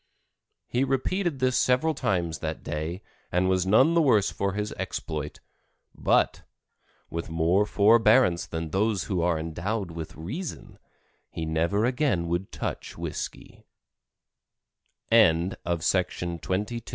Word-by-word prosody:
He 125 Hz, +2 st, 0 dB
repeated 150 Hz, +5 st, 0 dB
this 130 Hz, -1 st, +1 dB
several 130 Hz, +7 st, +2 dB
times 85 Hz, -, -1 dB
that -, -, -4 dB
day 80 Hz, +5 st, -4 dB, 0.3 s
and 90 Hz, +1 st, +2 dB
was 95 Hz, 0 st, +1 dB
none 110 Hz, -, +5 dB
the 170 Hz, -, +4 dB
worse 110 Hz, -10 st, +3 dB
for 100 Hz, -1 st, -2 dB
his 105 Hz, +1 st, -3 dB
exploit, 75 Hz, -2 st, -5 dB, 0.5 s
but, -, -, +1 dB, 0.7 s
with 85 Hz, 0 st, -4 dB
more 85 Hz, +5 st, +2 dB
forbearance 110 Hz, -3 st, +4 dB
than 80 Hz, -1 st, -5 dB
those 105 Hz, +2 st, +1 dB
who 95 Hz, -5 st, -1 dB
are 85 Hz, -1 st, +2 dB
endowed 85 Hz, +5 st, -3 dB
with 80 Hz, -1 st, -7 dB
reason, 125 Hz, -, -7 dB, 0.5 s
he 80 Hz, -, -5 dB
never 85 Hz, +7 st, +1 dB
again 125 Hz, -, +1 dB
would 85 Hz, +3 st, -2 dB
touch -, -, -5 dB
whisky. -, -, -6 dB, 1.5 s
Claudia 95 Hz, -5 st, +4 dB
May 85 Hz, 0 st, 0 dB
Ferrin. 85 Hz, 0 st, -1 dB
COCOA. 105 Hz, +8 st, -2 dB
95 Hz, 125 wpm, -26 LUFS, 85-115 Hz, 1.5 s, none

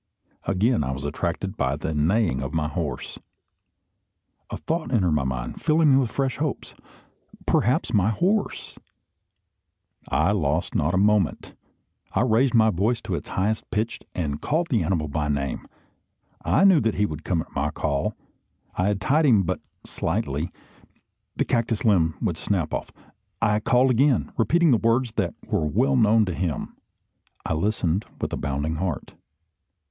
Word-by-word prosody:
Again 100 Hz, -, +2 dB
I 65 Hz, 0 st, -2 dB
was 70 Hz, +2 st, -6 dB
attracted 85 Hz, +6 st, -3 dB
by 65 Hz, +1 st, 0 dB
the 80 Hz, +2 st, -3 dB
neighing 80 Hz, -, +1 dB
of 70 Hz, +3 st, -5 dB
my 75 Hz, -2 st, +1 dB
horse. 75 Hz, -, -4 dB, 1.3 s
A -, -, -4 dB
thought 160 Hz, -5 st, -3 dB
entered 95 Hz, -9 st, +2 dB
my 75 Hz, -3 st, +1 dB
mind, 65 Hz, -2 st, -4 dB
filling 155 Hz, -1 st, +4 dB
me -, -, +6 dB
with 125 Hz, -4 st, 0 dB
fresh 135 Hz, 0 st, -1 dB
hopes. 150 Hz, -2 st, -3 dB, 0.7 s
"Perhaps -, -, +1 dB
my 100 Hz, 0 st, +3 dB
horse 190 Hz, -, -1 dB, 0.6 s
" -, -, -41 dB, 0.2 s
I -, -, +3 dB
lost 80 Hz, -5 st, 0 dB
not -, -, +1 dB
a -, -, +2 dB
moment. 100 Hz, -3 st, +1 dB, 0.6 s
I -, -, +2 dB
raised 125 Hz, +1 st, +3 dB
my 110 Hz, -1 st, +5 dB
voice 105 Hz, +6 st, 0 dB
to -, -, -4 dB
its -, -, -4 dB
highest 105 Hz, +4 st, -1 dB
pitch, 110 Hz, +2 st, -2 dB, 0.2 s
and 75 Hz, -4 st, -2 dB
called 165 Hz, +3 st, 0 dB
the 115 Hz, -, +3 dB
animal 80 Hz, -5 st, 0 dB
by 75 Hz, 0 st, -2 dB
name. 70 Hz, -2 st, -2 dB, 0.8 s
I -, -, +3 dB
knew 190 Hz, -6 st, +6 dB
that 110 Hz, -2 st, 0 dB
he 105 Hz, -, +2 dB
would 80 Hz, -4 st, -6 dB
come 85 Hz, -4 st, 0 dB
at -, -, -23 dB
my 75 Hz, +2 st, 0 dB
call. 75 Hz, -2 st, -2 dB, 0.6 s
I 90 Hz, -, +1 dB
had 100 Hz, -1 st, 0 dB
tied 150 Hz, +9 st, +3 dB
him 110 Hz, -7 st, +5 dB
but -, -, -2 dB, 0.3 s
slightly. 80 Hz, -3 st, -2 dB, 0.8 s
The -, -, 0 dB
cactus 115 Hz, 0 st, 0 dB
limb 85 Hz, -7 st, +3 dB
would -, -, -1 dB
snap -, -, -1 dB
off. -, -, -3 dB, 0.5 s
I 105 Hz, -2 st, +2 dB
called 125 Hz, +4 st, +3 dB
again, 130 Hz, 0 st, +2 dB
repeating 165 Hz, +9 st, +3 dB
words 115 Hz, +1 st, +2 dB
that 90 Hz, -5 st, 0 dB
were 75 Hz, -, 0 dB
well 130 Hz, -, +2 dB
known 110 Hz, -2 st, +4 dB
to 90 Hz, -, -3 dB
him. 85 Hz, -5 st, -3 dB, 0.7 s
I -, -, -1 dB
listened 95 Hz, +1 st, 0 dB
with -, -, -3 dB
a -, -, -1 dB
bounding 70 Hz, +3 st, -2 dB
heart. 85 Hz, -3 st, -3 dB
100 Hz, 160 wpm, -24 LUFS, 80-120 Hz, 1.3 s, me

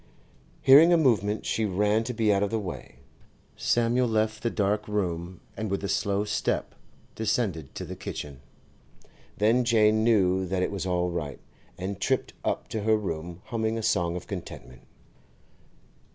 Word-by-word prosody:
Hearing 145 Hz, +6 st, +8 dB
a 170 Hz, -, +6 dB
movement, 110 Hz, -8 st, +1 dB
she 110 Hz, -, 0 dB
ran 105 Hz, +2 st, +1 dB
to 125 Hz, -, -3 dB
be 110 Hz, -2 st, +3 dB
out 100 Hz, -, +1 dB
of 100 Hz, -, +1 dB
the 115 Hz, -, -1 dB
way. 85 Hz, -, -7 dB, 0.6 s
Samuel 120 Hz, +1 st, +1 dB
left 110 Hz, -1 st, 0 dB
the 120 Hz, -, 0 dB
dark 105 Hz, 0 st, 0 dB
room, 90 Hz, -4 st, -3 dB
and 110 Hz, +1 st, -4 dB
with 100 Hz, +1 st, -2 dB
slow 100 Hz, 0 st, 0 dB
step 105 Hz, -, -1 dB, 0.4 s
descended 100 Hz, -, -2 dB
to -, -, -5 dB
the -, -, -7 dB
kitchen. 70 Hz, -2 st, -7 dB, 1.0 s
Then 115 Hz, +4 st, +3 dB
Jane 110 Hz, -2 st, +3 dB
knew 95 Hz, -5 st, +3 dB
that 90 Hz, 0 st, 0 dB
it -, -, -1 dB
was 95 Hz, -2 st, -3 dB
all 90 Hz, -1 st, 0 dB
right, 75 Hz, -6 st, -4 dB, 0.4 s
and 95 Hz, +1 st, -5 dB
tripped -, -, 0 dB
up -, -, -2 dB
to 110 Hz, -, -3 dB
her 110 Hz, +1 st, +3 dB
room 85 Hz, -3 st, -5 dB
humming 115 Hz, -1 st, -1 dB
a 115 Hz, -, -4 dB
song 85 Hz, -4 st, +1 dB
of 90 Hz, -, -6 dB
contentment. 60 Hz, +1 st, -8 dB
105 Hz, 160 wpm, -27 LUFS, 90-110 Hz, 1.0 s, Hearing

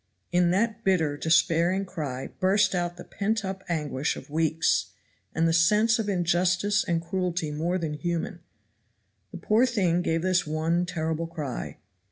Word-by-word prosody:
In 175 Hz, -1 st, +3 dB
that 220 Hz, +5 st, 0 dB
bitter, 165 Hz, -6 st, +2 dB
despairing 170 Hz, +4 st, +2 dB
cry 145 Hz, -8 st, -5 dB
burst 190 Hz, +1 st, +3 dB
out 175 Hz, -1 st, -2 dB
the 175 Hz, -, -8 dB
pent 210 Hz, +1 st, -2 dB
up 190 Hz, 0 st, -5 dB
anguish 150 Hz, -3 st, -1 dB
of -, -, -11 dB
weeks, 160 Hz, +1 st, +1 dB, 0.5 s
and 165 Hz, +1 st, +2 dB
the 165 Hz, -, +2 dB
sense 210 Hz, +7 st, +4 dB
of 210 Hz, -2 st, -2 dB
injustice 185 Hz, +3 st, +1 dB
and 170 Hz, -3 st, -1 dB
cruelty 175 Hz, -3 st, -2 dB
more 165 Hz, +5 st, -1 dB
than 160 Hz, -4 st, -3 dB
human. 170 Hz, +4 st, -3 dB, 0.9 s
The -, -, -8 dB
poor 220 Hz, +8 st, +3 dB
thing 185 Hz, -8 st, +1 dB
gave 165 Hz, -1 st, -1 dB
this 185 Hz, -2 st, +1 dB
one 165 Hz, +3 st, 0 dB
terrible 160 Hz, -1 st, -2 dB
cry. 150 Hz, -6 st, -5 dB
175 Hz, 155 wpm, -26 LUFS, 160-190 Hz, 0.9 s, sense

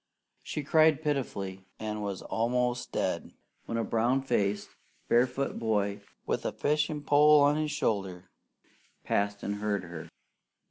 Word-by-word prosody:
She 150 Hz, -, -4 dB
cried 155 Hz, +1 st, +4 dB
pitifully, 100 Hz, -10 st, -3 dB
and 105 Hz, -1 st, -4 dB
was 100 Hz, -2 st, -4 dB
almost 125 Hz, +2 st, -1 dB
dead -, -, -2 dB, 0.3 s
when 115 Hz, -, -2 dB
a 115 Hz, -, 0 dB
brown 120 Hz, +4 st, +1 dB
faced, 105 Hz, -6 st, 0 dB, 0.4 s
barefoot 125 Hz, +3 st, +1 dB
boy, 105 Hz, -3 st, 0 dB, 0.2 s
with -, -, -1 dB
a -, -, -1 dB
fishing 150 Hz, 0 st, 0 dB
pole 150 Hz, +1 st, +6 dB
on 145 Hz, +1 st, +4 dB
his 155 Hz, 0 st, -1 dB
shoulder, 95 Hz, -10 st, -2 dB, 0.7 s
passed 100 Hz, 0 st, -1 dB
and 105 Hz, 0 st, -2 dB
heard 105 Hz, -2 st, -1 dB
her. 85 Hz, -2 st, -8 dB
115 Hz, 135 wpm, -29 LUFS, 100-145 Hz, 0.7 s, pole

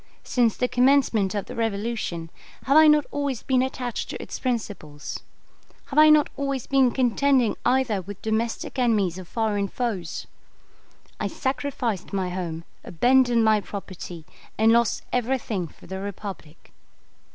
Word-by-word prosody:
Since 235 Hz, -3 st, +1 dB
the 250 Hz, -, +1 dB
commencement 245 Hz, -6 st, +3 dB
of 200 Hz, -, -2 dB
the -, -, -8 dB
Revolution, 210 Hz, -6 st, -3 dB, 0.3 s
have 275 Hz, -, +2 dB
I 315 Hz, 0 st, +8 dB
not 300 Hz, -1 st, +5 dB
always 280 Hz, -5 st, -2 dB
been 260 Hz, -1 st, +2 dB
attached 255 Hz, -2 st, -3 dB
to -, -, -5 dB
its -, -, -7 dB
principles? 205 Hz, -, -4 dB, 0.7 s
Have 285 Hz, -, +3 dB
I 310 Hz, 0 st, +8 dB
not 305 Hz, -1 st, +5 dB
always 275 Hz, -2 st, -2 dB
been 270 Hz, -2 st, +4 dB
contending 255 Hz, -1 st, +2 dB
either 250 Hz, -6 st, +2 dB
with 195 Hz, +2 st, -9 dB
domestic 225 Hz, +4 st, -2 dB
enemies 205 Hz, -8 st, +1 dB
or 185 Hz, -, -8 dB
foreign 205 Hz, 0 st, -1 dB
foes? 200 Hz, -8 st, -3 dB, 0.9 s
I -, -, -1 dB
sacrificed 260 Hz, -8 st, -3 dB
my 190 Hz, -2 st, -1 dB
home, 170 Hz, -3 st, -4 dB, 0.2 s
abandoned 245 Hz, +4 st, +3 dB
my 215 Hz, -1 st, +4 dB
property, 185 Hz, -5 st, -8 dB, 0.3 s
and 220 Hz, +1 st, +5 dB
lost 235 Hz, -2 st, +2 dB
everything 235 Hz, -7 st, -1 dB
for -, -, -18 dB
the 190 Hz, +1 st, -6 dB
Republic? 195 Hz, -5 st, -8 dB
230 Hz, 140 wpm, -25 LUFS, 195-260 Hz, 0.9 s, I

